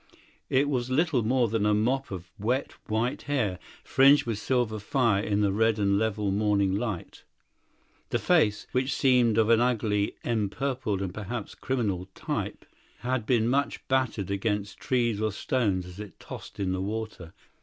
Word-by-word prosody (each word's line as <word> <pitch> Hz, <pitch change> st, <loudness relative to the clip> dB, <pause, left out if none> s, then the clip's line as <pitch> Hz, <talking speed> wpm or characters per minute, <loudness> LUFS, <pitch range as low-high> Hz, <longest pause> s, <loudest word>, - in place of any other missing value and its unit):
It 140 Hz, +2 st, +3 dB
was 130 Hz, -3 st, -1 dB
little 145 Hz, -1 st, +2 dB
more 120 Hz, +2 st, +2 dB
than 110 Hz, -1 st, 0 dB
a 105 Hz, 0 st, +3 dB
mop 130 Hz, +6 st, 0 dB
of 90 Hz, -2 st, -7 dB
wet 125 Hz, +7 st, 0 dB, 0.2 s
white 115 Hz, +3 st, -1 dB
hair, 110 Hz, -11 st, -1 dB, 0.2 s
fringed 135 Hz, +3 st, +5 dB
with 115 Hz, -3 st, -2 dB
silver 120 Hz, -3 st, 0 dB
fire 110 Hz, -2 st, +1 dB
in 105 Hz, -1 st, 0 dB
the 100 Hz, -2 st, +2 dB
red 110 Hz, +2 st, +2 dB
and 100 Hz, -1 st, +2 dB
level 105 Hz, -2 st, 0 dB
morning 100 Hz, -1 st, +2 dB
light; 105 Hz, -5 st, -4 dB, 0.9 s
the -, -, +1 dB
face, 105 Hz, -1 st, +2 dB
which 130 Hz, +1 st, 0 dB
seemed 125 Hz, -4 st, +3 dB
of 110 Hz, 0 st, +4 dB
an 115 Hz, 0 st, +5 dB
ugly, 110 Hz, -4 st, +1 dB
empurpled 115 Hz, -1 st, -1 dB
and 90 Hz, -2 st, -4 dB
perhaps 105 Hz, +2 st, -5 dB
criminal 100 Hz, -8 st, -2 dB
type, -, -, -4 dB, 0.4 s
had 125 Hz, -2 st, -1 dB
been 115 Hz, -3 st, +3 dB
much 140 Hz, +3 st, 0 dB
battered 125 Hz, -7 st, 0 dB
against 100 Hz, 0 st, -2 dB
trees 120 Hz, -5 st, 0 dB
or 110 Hz, 0 st, +1 dB
stones 100 Hz, -4 st, 0 dB
as 90 Hz, +2 st, -11 dB
it 105 Hz, -2 st, -9 dB
tossed -, -, -10 dB
in 95 Hz, -2 st, 0 dB
the 95 Hz, 0 st, -1 dB
water. 105 Hz, -4 st, -5 dB
110 Hz, 165 wpm, -27 LUFS, 100-125 Hz, 0.9 s, fringed